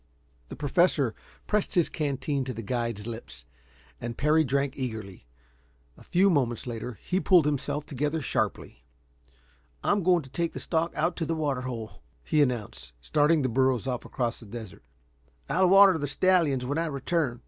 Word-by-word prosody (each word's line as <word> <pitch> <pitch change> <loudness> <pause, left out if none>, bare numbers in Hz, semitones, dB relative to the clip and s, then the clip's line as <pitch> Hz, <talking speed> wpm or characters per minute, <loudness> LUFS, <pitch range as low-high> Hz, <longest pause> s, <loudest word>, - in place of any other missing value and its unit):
The - - -7
Professor 145 -4 +2 0.3
pressed 210 -1 0
his 175 -3 +4
canteen 140 -1 -2
to 130 -2 -5
the 115 - -6
guide's 115 -2 -3
lips, 110 - -8 0.5
and 120 -1 -5
Parry 155 +2 +3
drank 140 0 0
eagerly. 110 - -6 0.7
A - - -18
few 190 +2 +3
moments 125 -7 0
later 120 -1 -5
he 185 - 0
pulled 180 -5 +5
himself 150 0 -1
together 150 +3 -2
sharply. - - -3 1.0
"I'm 205 0 +2
going 175 -2 +3
to 135 - -14
take 170 +2 -2
the - - -5
stock 165 0 0
out 175 - 0
to 165 - -1
the 165 - 0
water 145 -5 -1
hole," 120 -4 -6 0.2
he 150 - +2
announced, 120 - -2
starting 150 - +2
the - - +2
burros 130 0 +1
off 125 -2 -3
across 120 -2 -3
the 115 - -13
desert. 110 -1 -9 0.6
"I'll 185 +1 +3
water 195 -2 +7
the 145 - -2
stallions 155 -5 +2
when 145 +5 -1
I 165 - 0
return." 140 -3 -1
140 Hz, 170 wpm, -27 LUFS, 120-165 Hz, 1.0 s, water